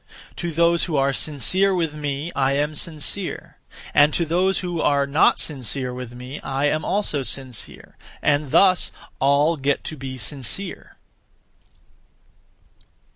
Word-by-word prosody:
To 175 - -3
those 170 +1 +2
who 160 -5 -2
are 135 0 +2
sincere 185 - +2
(with 165 -4 -1
me), 145 +2 -4
I 135 0 +2
am 145 +2 0
sincere; 165 +5 -3 0.4
and 145 +1 +5
to 170 - +1
those 180 +4 +1
who 175 -2 -3
are 140 -1 +2
not 140 +3 +3
sincere 130 -2 -2
(with 125 -1 -7
me), 125 +4 -8
I 135 +1 -2
am 155 +1 +1
also 195 -8 -1
sincere; 130 -2 -1 0.2
and 145 -1 +1
thus 185 +5 +4 0.3
(all) 145 +4 +3
get 140 +1 0
to 155 - -5
be 130 -2 -7
sincere. 145 - -3
145 Hz, 135 wpm, -22 LUFS, 135-170 Hz, 0.4 s, and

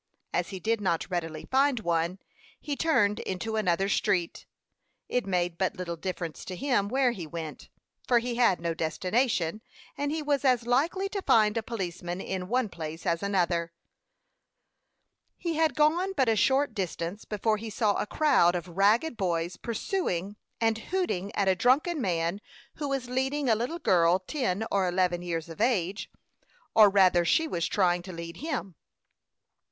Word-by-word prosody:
As - - 0
he 190 - -6
did 225 +3 0
not 180 -1 -1
readily 165 -3 -3
find 265 -2 +3
one, 170 0 0 0.4
he 290 - -3
turned 210 -11 +2
into 220 +4 -3
another 195 -2 +1
street. 195 -3 0 0.6
It 250 -4 -1
made 175 -2 -1
but 190 +2 0
little 175 -2 -4
difference 170 -4 -5
to 185 - -5
him 240 -3 +1
where 260 0 +2
he 180 -9 -6
went, 160 -1 -7 0.4
for 245 - +4
he 240 +1 -1
had 235 -6 +3
no 170 0 -2
destination, 180 +4 0 0.3
and 285 0 -2
he 315 0 -2
was 285 -2 0
as 250 -3 +3
likely 315 +11 +1
to 400 -1 -3
find 215 - +4
a 230 - 0
policeman 180 -5 -4
in 190 -1 -4
one 250 +2 +1
place 160 -3 -7
as 170 0 0
another. 175 -4 0 1.6
He 340 -2 -2
had 320 -1 +2
gone 335 +6 +2
but 265 -3 +3
a 225 - +3
short 265 +4 +2
distance 185 0 -4
before 215 +1 0
he 225 +1 -6
saw 210 -1 +1
a - - -2
crowd 195 - +3
of 175 0 -4
ragged 210 - +2
boys 175 -3 -1
pursuing 210 - -2 0.2
and 225 -1 +1
hooting 225 - -2
at 200 - +1
a 190 - +5
drunken 280 - +2
man 170 0 -1 0.4
who 290 -2 -3
was 270 -2 -2
leading 265 +3 -1
a - - +6
little 245 +10 -2
girl 175 - +3
ten 215 0 -2
or 195 -2 +2
eleven 180 -1 +1
years 170 -2 -3
of 165 +3 -8
age, 205 -5 0 0.6
or 215 -2 +8
rather, 185 -3 +4
she 320 - +2
was 170 - -1
trying 180 -3 +2
to 185 +1 -9
lead 170 -1 -7
him. 265 - -4
200 Hz, 170 wpm, -28 LUFS, 175-250 Hz, 1.6 s, or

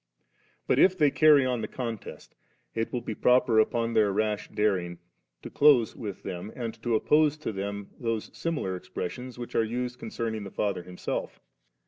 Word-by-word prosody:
But - - +2
if 185 0 +5
they 150 -4 +4
carry 150 -3 +6
on 125 -3 0
the - - -3
contest, 115 -5 -6 0.4
it 115 0 -2
will 125 - -2
be 115 - -4
proper 125 0 +4
upon 115 +1 +1
their 110 -3 +3
rash 105 +1 -1
daring 90 -5 0 0.5
to - - -8
close 140 -6 +5
with 105 -4 -7
them, 95 +2 -6
and 115 -3 -4
to 115 0 +1
oppose 150 +5 +3
to 155 - -4
them 100 0 -5
those 115 -2 -2
similar 150 - -2
expressions 125 +7 -6
which 120 -1 -7
are 115 - +3
used 125 +2 -3
concerning 110 -1 -4
the 100 - -7
Father 100 -1 -1
Himself. 90 +1 -5
115 Hz, 170 wpm, -28 LUFS, 100-125 Hz, 0.5 s, carry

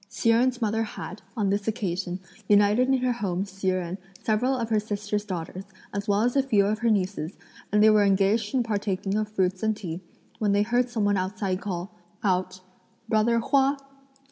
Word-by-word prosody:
Hsi 230 - +1
Jen's 245 +1 +2
mother 220 +1 +1
had, 210 -2 -6 0.2
on 200 -3 +1
this 200 +1 -1
occasion, 190 -4 -2 0.3
united 205 +4 +5
in 265 0 +3
her 255 - +2
home 195 -5 -2
Hsi 195 -1 -6
Jen, 185 -1 -2 0.3
several 240 +5 +1
of 230 -2 -2
her 215 - +4
sister's 205 0 -3
daughters, 185 -1 -5 0.3
as 200 +1 -3
well 205 +1 +2
as 245 +2 +1
a 275 - +5
few 220 -7 +3
of 210 +1 0
her 235 - +2
nieces, 190 -4 -1 0.3
and 210 +1 +4
they 220 - +8
were 210 -1 +5
engaged 200 +4 +2
in 250 - +3
partaking 200 -3 -2
of 215 0 0
fruits 190 -3 0
and 220 -1 0
tea, 175 -3 -5 0.4
when 210 -3 +2
they 205 0 +3
heard 245 +3 +1
some 225 -4 -1
one 205 -1 +2
outside 190 0 -2
call 190 0 -4 0.3
out, 185 -1 0 0.5
"Brother 220 +2 +3
Hua." 275 +3 +2
205 Hz, 195 wpm, -26 LUFS, 195-225 Hz, 0.5 s, they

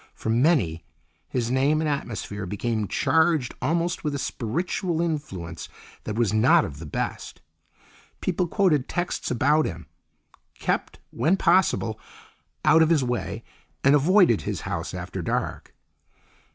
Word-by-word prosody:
For 110 - -3
many, 115 - +2 0.5
his 120 -2 -1
name 140 +4 +2
and 160 - 0
atmosphere 110 -8 -4
became 110 +2 -2
charged 160 - +2
almost 165 +6 0
with 150 -2 -1
a - - -1
spiritual 165 - -2
influence 120 - -4 0.4
that 105 - -3
was 115 -3 +1
not 110 +4 +5
of 70 -2 -8
the 80 - -8
best. - - -4 0.8
People 180 -1 -1
quoted 165 -8 +2
texts 175 0 -2
about 145 +5 +2
him; 85 -2 -7 0.7
kept - - -2
when 175 +5 +2
possible 170 - +2 0.7
out 160 - +6
of 160 - +4
his 160 -5 +3
way, 125 -1 -3 0.4
and 140 - +5
avoided 165 - +4
his - - -4
house - - -4
after - - -5
dark. - - -3
140 Hz, 135 wpm, -25 LUFS, 110-165 Hz, 0.8 s, out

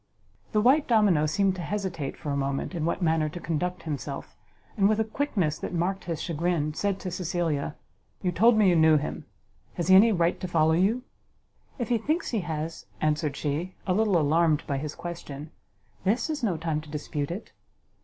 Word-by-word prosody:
The 215 - +2
white 275 +6 +4
domino 205 -10 +4
seemed 195 +4 +2
to - - -4
hesitate 175 -6 -3
for 150 - -4
a - - 0
moment 140 +4 -2
in 165 -3 -2
what 170 +2 -1
manner 160 -2 +2
to 175 +3 -7
conduct 180 +2 -2
himself, 145 -3 -5 0.4
and 200 -3 +4
with 215 0 +2
a - - +4
quickness 215 - -1
that - - -4
marked 185 +3 -1
his 165 -3 -3
chagrin, 165 -2 -1
said 195 +3 -1
to 185 - -4
Cecilia, 165 -4 -1 0.5
"You 180 - +1
told 225 +6 +5
me 210 -2 +5
you 180 - +5
knew 160 -1 +6
him, 150 - -4 0.5
has 175 - -2
he 190 - +9
any 220 +4 +7
right 170 -3 +1
to 185 - -4
follow 160 -2 +3
you?" 205 +9 +2 0.7
"If 240 -4 -3
he 235 -2 +2
thinks 310 - -1
he 225 - +1
has," 160 -2 -4
answered 150 -1 0
she, 160 +5 -2
a 185 - +1
little 205 -2 +3
alarmed 155 0 +3
by 140 -1 -1
his 150 +1 -5
question, 155 -3 -7 0.5
"this 225 - +1
is 300 -2 -3
no 195 -8 0
time 155 -1 -2
to 155 - -14
dispute 145 -1 -3
it." 180 +6 -6
170 Hz, 195 wpm, -27 LUFS, 155-200 Hz, 0.7 s, he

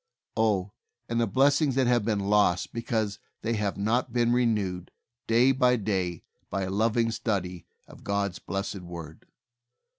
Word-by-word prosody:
Oh, 105 -4 +1 0.4
the 115 0 +1
blessings 140 +4 +3
that 135 -1 +3
have 120 -2 +3
been 105 -2 0
lost 100 -3 +2
because 110 -3 -2 0.2
they 115 +1 0
have 105 -3 -1
not 115 +5 0
been 120 0 +2
renewed 105 -7 0 0.4
day 120 +4 +5
by 125 -2 +3
day 95 -6 -2 0.3
by 100 - -2
a 95 - -3
loving 115 +3 +1
study 90 -6 -3 0.2
of - - -15
God's 100 -2 -1
blessed 95 0 -4
Word 85 -3 -9
105 Hz, 145 wpm, -27 LUFS, 95-120 Hz, 0.4 s, day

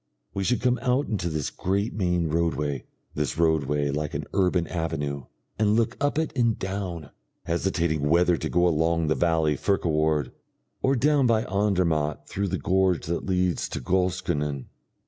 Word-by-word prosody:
We 100 - -2
should 125 +5 +1
come 125 -1 +2
out 130 +3 +1
into 95 -6 -1
this 75 -3 -2
great 100 +4 -1
main 90 -4 0
roadway 75 -4 -1 0.3
this 75 -4 -2
roadway 75 -3 +1
like 75 +1 -3
an - - -2
urban 90 -3 +2
avenue 75 -6 -3 0.3
and 105 -1 +3
look 115 +1 +1
up 145 +1 +1
it 160 -2 -1
and 115 -4 +2
down, 95 -6 -4 0.3
hesitating 85 -4 0
whether 85 +2 +4
to - - -3
go 90 0 +3
along 80 0 +1
the - - +4
valley 80 -3 +2
Furka 100 +7 0
ward, 75 -4 +1 0.5
or 135 +1 +2
down 140 +1 +3
by 115 -1 +3
Andermatt 85 -7 0
through 100 +1 -2
the - - -1
gorge 95 -2 +1
that 85 +3 -3
leads 90 -2 0
to - - -4
Goschenen.... 85 -4 -1
85 Hz, 165 wpm, -26 LUFS, 75-100 Hz, 0.5 s, whether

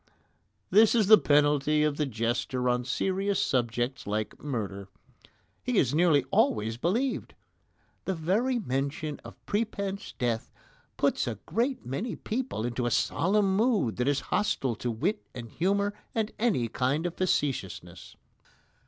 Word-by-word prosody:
That 215 +4 +6
is 220 -3 +4
the 215 +2 +8
penalty 150 +1 +3
of 150 -1 0
the 150 - 0
jester 120 +2 -1
on 125 0 +1
serious 195 +7 0
subjects 120 - -1
like 105 +1 -3
murder. 100 -8 -4 0.7
He 250 -3 -1
is 130 -7 +3
nearly 155 -4 +4
always 110 +1 +2
believed. 225 - -1 0.7
The 190 - -1
very 210 +11 +1
mention 145 - -2
of - - -10
prepense 200 -1 -3
death 115 -2 -1 0.5
puts - - +1
a 115 -4 -3
great 245 - -1
many 185 - -3
people 230 - -3
into 120 0 -1
a - - +1
solemn 190 - +2
mood 210 - +2
that 125 +1 0
is 145 -1 +2
hostile 135 - +1
to 120 - -3
wit 155 - -1
and 120 -2 -6
humour 200 - 0 0.2
and 220 -2 0
any 210 - +1
kind 130 +7 -1
of 175 - -2
facetiousness. 100 - -2
150 Hz, 140 wpm, -28 LUFS, 125-200 Hz, 0.7 s, the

